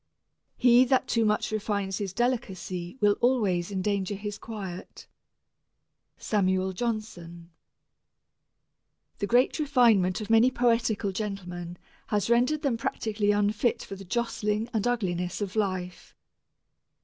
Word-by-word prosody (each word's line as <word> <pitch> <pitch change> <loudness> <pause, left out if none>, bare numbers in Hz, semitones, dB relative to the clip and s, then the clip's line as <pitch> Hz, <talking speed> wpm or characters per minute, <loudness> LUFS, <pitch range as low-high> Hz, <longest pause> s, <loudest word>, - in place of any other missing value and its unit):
He 245 0 +6
that 260 0 +2
too 230 - +1
much 210 0 0
refines 200 -2 -2
his 200 -3 -3
delicacy 190 -5 -3
will 205 -1 +4
always 205 -8 +1
endanger 200 0 -1
his 205 +1 -6
quiet. 195 -5 -8 1.1
SAMUEL 190 -2 0
JOHNSON. 180 -6 -5 1.7
The 205 - -1
great 245 +8 +3
refinement 235 - +3
of 215 0 -5
many 225 +3 +6
poetical 230 -5 +1
gentlemen 180 -4 -5 0.3
has 210 +1 0
rendered 255 +6 +2
them 265 -5 +1
practically 215 -2 -2
unfit 205 +3 +1
for 195 - -8
the 195 - -10
jostling 220 +1 -1
and 220 +1 0
ugliness 180 -7 -1
of 205 -1 -4
life. 185 -4 -3
210 Hz, 115 wpm, -27 LUFS, 190-230 Hz, 1.7 s, He